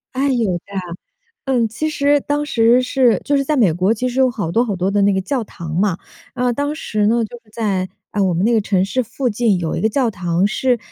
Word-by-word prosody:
哎， 275 +2 +1
有 235 -7 +1
的。 - - -10 0.9
嗯， 250 -4 +1
其 240 +8 -3
实 290 -1 +2
当 290 +1 -2
时 235 -2 +3
是 250 -2 +2
就 285 - +1
是 275 - +1
在 305 - +1
美 220 - +4
国 185 +6 +2
其 250 +3 -2
实 250 +2 -3
有 260 -1 +4
好 205 -9 -3
多 230 +7 +3
好 215 -5 -2
多 185 +2 -1
的 205 0 +2
那 200 0 +3
个 190 - 0
教 250 +5 -2
堂 170 -5 -8
嘛， 185 -1 +1 0.4
呃， 250 -1 +1
当 285 +4 -2
时 210 -8 -1
呢， 230 +1 +2
就 240 +3 -10
是 215 - -26
在， 200 -5 -1 0.2
呃， 205 - -1
我 185 -2 +1
们 175 +4 0
那 235 - +3
个 225 - +3
城 195 -2 +1
市 255 +6 -1
附 245 +2 -2
近 215 -2 +1
有 165 -2 -2
一 - - -3
个 220 - +2
教 245 0 +1
堂 175 -1 0
是， 245 +4 +1
230 Hz, 270 characters per minute, -19 LUFS, 195-255 Hz, 0.9 s, 美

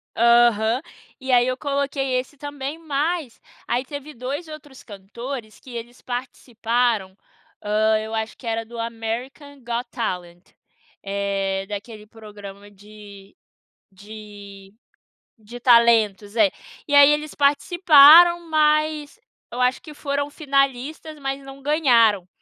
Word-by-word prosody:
Aham. 235 0 +3 0.4
E 265 -1 -4
aí 245 0 +4
eu 255 0 -2
coloquei 275 -2 -2
esse 265 +3 -9
também, 290 +1 -6
mas 310 -2 -3 0.3
aí 250 - -1
teve 285 +2 -9
2 270 +6 -6
outros 295 -3 -12
cantores 215 +3 -9
que 255 - -14
eles 235 +1 -9
participaram, 240 -4 -2 0.5
hã, 215 +1 +2
eu 220 +1 -7
acho 220 0 -4
que 250 - -15
era 225 0 -2
do 235 +1 -11
American 235 +5 -6
Got 240 +1 -3
Talent, 180 -6 -5 0.6
eh, 195 -1 -2
daquele 210 +1 -8
programa 205 -2 -12
de 205 -1 -15 0.6
de 200 -1 -13 0.7
de 235 +3 -11
talentos, 230 -4 +3
é, 210 -4 +4 0.4
e 290 - -4
aí 285 0 +8
eles 300 0 -1
participaram, 320 +3 +6
mas 305 +2 +1 0.3
eu 245 - -6
acho 250 +1 +1
que 305 - -12
foram 285 0 -3
finalistas, 280 +1 -2
mas 270 0 -4
não 270 0 -12
ganharam. 235 - +3
245 Hz, 125 wpm, -22 LUFS, 215-285 Hz, 0.7 s, aí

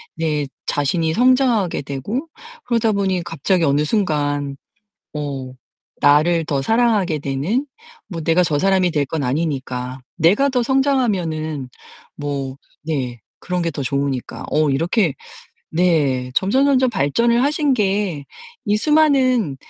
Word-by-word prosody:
내 150 -3 -1 0.2
자신이 160 +3 0
성장하게 245 - +2
되고 200 - -4 0.4
그러다 230 -2 +1
보니 190 -3 0
갑자기 175 +1 0
어느 145 0 +2
순간 145 -7 -1 0.6
어 135 -3 -4 0.5
나를 155 +4 +4
더 140 -2 0
사랑하게 215 - +2
되는 145 - -1 0.4
뭐 170 -4 -5
내가 165 +3 +3
저 150 -3 0
사람이 190 -1 +2
될 145 -3 +1
건 150 +1 -3
아니니까. 130 -3 -3 0.2
내가 200 - +3
더 250 -2 +1
성장하면은 190 - 0 0.5
뭐 140 -2 -4 0.3
네 130 -6 -3 0.2
그런 180 0 -2
게 165 - -1
더 145 - -5
좋으니까. 140 -1 -3
어 150 -2 +2
이렇게 165 - +1 0.6
네 150 -7 +1
'점점점점 260 +5 +3
발전을 235 - +2
하신 290 0 +1
게 195 - -1 0.4
이 210 0 +2
수많은 260 - +3
165 Hz, 250 characters per minute, -20 LUFS, 145-220 Hz, 0.6 s, 나를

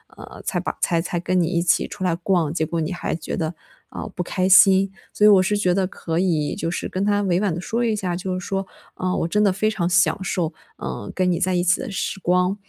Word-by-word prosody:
呃， - - -11
才 - - -1
把 - - -4
才 170 -2 +1
才 175 0 -3
跟 180 +1 0
你 165 - +1
一 170 0 0
起 175 - +2
出 - - -7
来 180 -2 +2
逛， 170 -3 0
结 160 -2 -1
果 170 - -2
你 160 +3 -2
还 175 - -3
觉 155 -1 -5
得， 160 +1 -3 0.3
呃， - - -6
不 - - -2
开 185 +1 -1
心。 195 0 +6 0.2
所 210 - +2
以 - - +9
我 200 -3 +7
是 205 +3 +1
觉 185 -3 +2
得 190 0 +1
可 165 -3 -3
以 165 -5 0
就 165 - -3
是 175 - -3
跟 185 - -3
他 205 0 +2
委 180 -2 +1
婉 200 -2 0
地 165 - -4
说 230 +6 -2
一 225 -2 +1
下， 185 -4 -2
就 185 +1 -3
是 185 - -8
说， 195 -1 -2 0.3
“啊， 185 0 -2
我 - - 0
真 210 +5 +1
的 200 - +4
非 215 +3 0
常 175 -5 -1
享 185 +2 +2
受， 175 -4 -1 0.2
呃， 65 +10 -6
跟 185 -1 +2
你 170 - 0
在 185 0 +1
一 175 - +1
起 180 0 +3
的 260 - -5
时 195 0 -3
光， 180 +1 +1
180 Hz, 285 characters per minute, -22 LUFS, 175-195 Hz, 0.3 s, 以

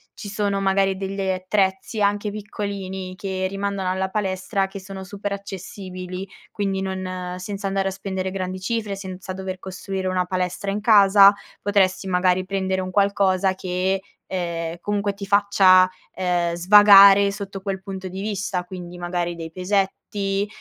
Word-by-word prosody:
ci 205 - -8
sono 200 -1 -1
magari 195 0 +2
delle 195 0 -2
attrezzi, 190 +2 -1
anche 205 +1 +1
piccolini, 200 -3 -5
che 190 -1 -3
rimandano 195 -1 -2
alla 190 0 -1
palestra 195 0 -1
che 195 +1 -8
sono 190 0 -8
super 200 +1 -5
accessibili. 190 -1 -7 0.2
Quindi 195 -2 -2
non 185 -1 -4
senza 200 +2 -6
andare 195 0 0
a - - -5
spendere 190 -1 -4
grandi 185 -1 -4
cifre, 210 +1 -2
senza 190 -1 -7
dover 190 0 -5
costruire 190 0 -5
una 185 -1 0
palestra 185 +1 -2
in 210 +1 -3
casa, 200 -2 +7 0.3
potresti 195 -2 +1
magari 185 0 +2
prendere 190 0 -1
un 185 - -5
qualcosa 195 -1 +2
che, 185 +1 -1 0.3
ehm, 170 -2 -3
comunque 205 -1 -1
ti 200 0 -7
faccia 195 -2 +5 0.2
ehm, 175 -2 0
svagare 200 +1 +8
sotto 195 -1 -7
quel 195 -1 -4
punto 190 -1 -6
di 190 +2 -6
vista: 200 -3 -2
quindi 180 -1 -8
magari 175 -1 -2
dei 165 -1 -7
pesetti, 195 +2 -1
190 Hz, 150 wpm, -23 LUFS, 185-200 Hz, 0.3 s, svagare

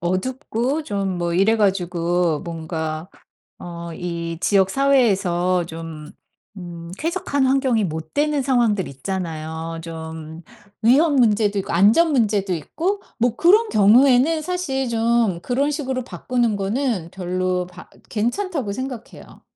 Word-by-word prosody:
어둡고 250 - -2
좀 195 -6 -2
뭐 170 -1 -1
이래 200 +5 +3
가지고 175 -4 +1
뭔가 160 0 -5 0.5
어 170 -1 -7
이 170 -1 -4
지역 195 -1 +3
사회에서 195 -10 +2
좀 160 -2 -8 0.4
음 170 -2 -8
쾌적한 310 -5 0
환경이 260 -5 +2
못 160 -2 -5
되는 295 -1 +1
상황들 240 -7 +1
있잖아요. 160 +1 -5
좀 160 0 -8 0.4
위험 285 +7 +4
문제도 215 -5 +3
있고 - - -5
안전 215 - +5
문제도 210 -8 +1
있고 345 - -2 0.2
뭐 240 0 +2
그런 425 +6 +5
경우에는 255 - +5
사실 305 -7 -2
좀 230 -4 +1
그런 275 +4 0
식으로 265 -4 -2
바꾸는 240 -2 -1
거는 200 - -1
별로 185 0 -1
바 180 0 -13 0.2
괜찮다고 245 - -2
생각해요. 255 0 -8
200 Hz, 260 characters per minute, -21 LUFS, 170-260 Hz, 0.5 s, 안전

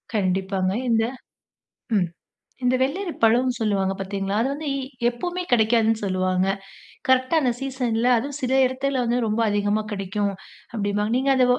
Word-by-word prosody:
கண்டிப்பாங்க. 190 -1 0 0.2
இந்த 225 -1 +3 0.9
ம் 180 -3 +3 0.6
இந்த 250 +1 +3
வெள்ளரி 340 +8 0
பழம்னு 245 +3 +4
சொல்லுவாங்க 195 -3 +1
பார்த்தீங்களா, 195 +1 -2
அது 260 - +1
வந்து 295 +1 -4 0.4
எப்போவுமே 350 +9 -4
கிடைக்காதுன்னு 225 -1 +3
சொல்லுவாங்க. 185 -1 +1 0.6
கரெக்ட்டா 260 +4 +3
அந்த 255 -3 +2
சீசன்ல 250 -3 0
அதுவும் 280 +4 -3
சில 255 0 0
இடத்துல 260 0 -1
வந்து 240 +1 +1
ரொம்ப 215 +2 0
அதிகமா 205 +1 +1
கிடைக்கும், 200 0 -1 0.4
அப்படிம்பாங்க. 205 0 -1
நீங்க 270 +1 +2
அத 255 -1 +4
225 Hz, 135 wpm, -24 LUFS, 200-260 Hz, 0.9 s, பழம்னு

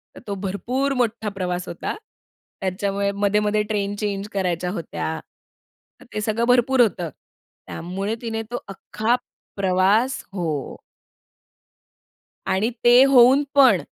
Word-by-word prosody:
तर - - -10
तो 200 - -2
भरपूर 240 +8 -2
मोठा 230 -4 -1
प्रवास 180 -2 -3
होता. 170 - -4 0.7
त्याच्यामुळे 200 +1 -1
मध्ये-मध्ये 210 +1 +1
ट्रेन 205 -1 -1
चेंज 205 -1 -2
करायच्या 180 -2 -1
होत्या. 160 -3 -4 0.8
तर - - -14
ते 215 - -2
सगळं 220 +2 0
भरपूर 250 +1 +4
होतं. 180 -7 +1 0.6
त्यामुळे 195 +6 -4
तिने 225 -2 -3
तो 245 - -3
अख्खा 215 +4 -1 0.4
प्रवास 195 +6 +2
हो. 160 -8 -3 1.7
आणि 200 +4 +1
ते 245 +2 +8
होऊन 270 +1 +6
पण, 275 -2 +6
205 Hz, 115 wpm, -22 LUFS, 190-235 Hz, 1.7 s, ते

